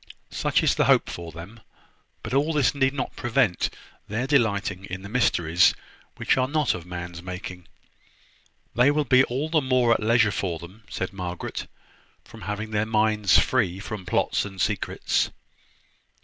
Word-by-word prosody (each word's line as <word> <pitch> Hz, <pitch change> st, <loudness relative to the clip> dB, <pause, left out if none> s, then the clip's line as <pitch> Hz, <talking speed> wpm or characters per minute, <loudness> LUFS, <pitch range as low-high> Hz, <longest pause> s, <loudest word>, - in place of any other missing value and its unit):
Such -, -, +1 dB
is -, -, +2 dB
my -, -, +4 dB
hope -, -, +3 dB
for 85 Hz, -1 st, -7 dB
them. 85 Hz, +8 st, -10 dB, 0.6 s
But -, -, -5 dB
all 145 Hz, +4 st, +2 dB
this 145 Hz, -5 st, +2 dB
need 135 Hz, -1 st, +2 dB
not 135 Hz, -, -4 dB
prevent 120 Hz, -6 st, +1 dB, 0.4 s
their 110 Hz, +5 st, -2 dB
delighting 100 Hz, -8 st, +1 dB
in 95 Hz, 0 st, -7 dB
the 100 Hz, -, -8 dB
mysteries 90 Hz, -7 st, +3 dB, 0.4 s
which -, -, +1 dB
are 130 Hz, 0 st, +2 dB
not 150 Hz, -2 st, +1 dB
of 85 Hz, 0 st, -8 dB
man's 90 Hz, -1 st, -6 dB
making." 90 Hz, -1 st, -7 dB, 1.1 s
"They 125 Hz, +4 st, +4 dB
will 150 Hz, 0 st, +1 dB
be 130 Hz, +1 st, +5 dB
all 135 Hz, +5 st, -2 dB
the 160 Hz, -1 st, +2 dB
more 130 Hz, -3 st, +3 dB
at -, -, -1 dB
leisure 115 Hz, 0 st, +3 dB
for 85 Hz, -2 st, -2 dB
them," 95 Hz, +7 st, -13 dB
said 95 Hz, 0 st, -4 dB
Margaret, 90 Hz, -2 st, -5 dB, 0.6 s
"from -, -, -13 dB
having 105 Hz, +3 st, -4 dB
their 105 Hz, 0 st, 0 dB
minds 105 Hz, -3 st, +3 dB
free 90 Hz, +1 st, +1 dB
from 100 Hz, -3 st, -7 dB
plots -, -, +1 dB
and 95 Hz, -2 st, -8 dB
secrets." -, -, 0 dB
105 Hz, 165 wpm, -25 LUFS, 90-125 Hz, 1.1 s, be